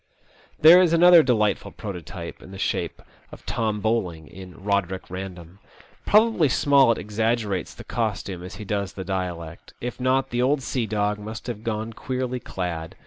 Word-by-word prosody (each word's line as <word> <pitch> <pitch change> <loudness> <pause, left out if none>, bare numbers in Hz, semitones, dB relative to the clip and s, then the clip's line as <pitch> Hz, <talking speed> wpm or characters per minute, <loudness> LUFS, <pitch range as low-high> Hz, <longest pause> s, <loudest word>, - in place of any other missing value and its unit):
There 170 +4 +9
is 170 -3 +3
another 175 0 +8
delightful 110 -7 +1
prototype 90 -3 -8
in - - -13
the 95 - -9
shape - - -2 0.3
of - - -13
Tom 110 -3 -1
Bowling 95 -8 -1
in 90 0 -11
"Eoderick 95 -1 -2
Bandom.*' 90 -1 -8 0.5
Probably 210 -8 +4
Smollett 135 -3 +4
exaggerates 105 -2 -1
the - - -10
costume 100 -5 -3
as 90 +2 -8
he 105 - -8
does 100 -1 -2
the 95 - -6
dialect. 90 -3 -5
If 125 +2 -5
not, 130 +1 +1
the 120 0 0
old 135 +2 +2
sea 125 -3 -2
dog 105 0 -1
must 110 +2 -7
have 115 -3 -5
gone 110 0 -3
queerly 125 +1 -3
clad. 90 -5 -5
105 Hz, 160 wpm, -24 LUFS, 95-125 Hz, 0.5 s, There